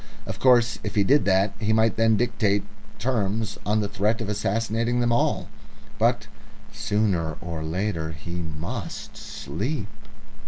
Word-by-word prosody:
Of - - -5
course, 120 -3 +4
if 105 +1 -4
he 100 - +4
did 140 +8 +4
that, 95 +1 +3
he 110 0 +1
might 110 0 +3
then 115 -1 +4
dictate 105 -4 +1 0.3
terms 110 -3 -1
on 105 +1 +2
the 105 - -1
threat 105 +2 0
of 110 -3 -3
assassinating 115 +3 0
them 120 -1 +2
all. 120 - +1 0.5
But - - +2 0.5
sooner 105 -7 0
or 85 -2 -5
later 80 0 -1
he 80 +2 -6
must 85 +6 -5
sleep!... 105 - -4
105 Hz, 145 wpm, -25 LUFS, 95-115 Hz, 0.5 s, course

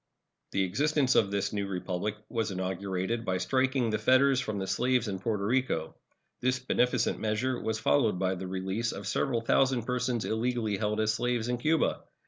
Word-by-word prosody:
The 95 - +1
existence 140 - +2
of 100 - +3
this 100 +1 -1
new 100 -1 -1
Republic 95 +2 -3
was 115 -2 -1
inaugurated 95 +3 -2
by 95 -4 0
striking 130 +1 +1
the 110 - 0
fetters 130 +4 +4
from 110 -5 -3
the 95 - -2
slaves 125 +2 +1
in 95 -2 -3
Porto 105 0 -1
Rico. 125 -8 0 0.5
This 130 +1 +1
beneficent 125 -1 +1
measure 110 +4 -1
was 110 0 -1
followed 115 -5 +2
by 95 0 0
the 95 0 -5
release 95 +5 -2
of 100 - -7
several 115 +4 0
thousand 130 +1 +2
persons 125 -1 -1
illegally 110 -2 -1
held 105 0 -1
as 110 0 +2
slaves 120 0 -1
in 125 -1 -1
Cuba. 155 +5 +1
110 Hz, 175 wpm, -29 LUFS, 100-125 Hz, 0.5 s, fetters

